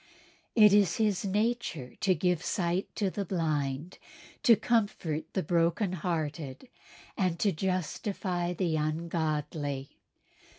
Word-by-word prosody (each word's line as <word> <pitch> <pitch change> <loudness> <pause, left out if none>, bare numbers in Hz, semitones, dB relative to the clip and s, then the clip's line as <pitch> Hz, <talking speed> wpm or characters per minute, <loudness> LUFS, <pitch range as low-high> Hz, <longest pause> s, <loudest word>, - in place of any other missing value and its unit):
It 210 -3 +7
is 200 -5 +4
His 210 -4 +1
nature 200 - -1
to 190 -3 +2
give 180 0 +1
sight 180 0 0
to 200 -3 0
the 200 - -2
blind, 155 -3 -2 0.4
to 230 - +7
comfort 200 -9 0
the 190 - 0
broken 175 +4 +1
hearted 155 - -3 0.5
and 185 -5 0
to 200 - +2
justify 185 +1 -2
the 170 -2 0
ungodly." 155 -3 -2
175 Hz, 115 wpm, -30 LUFS, 155-195 Hz, 0.5 s, It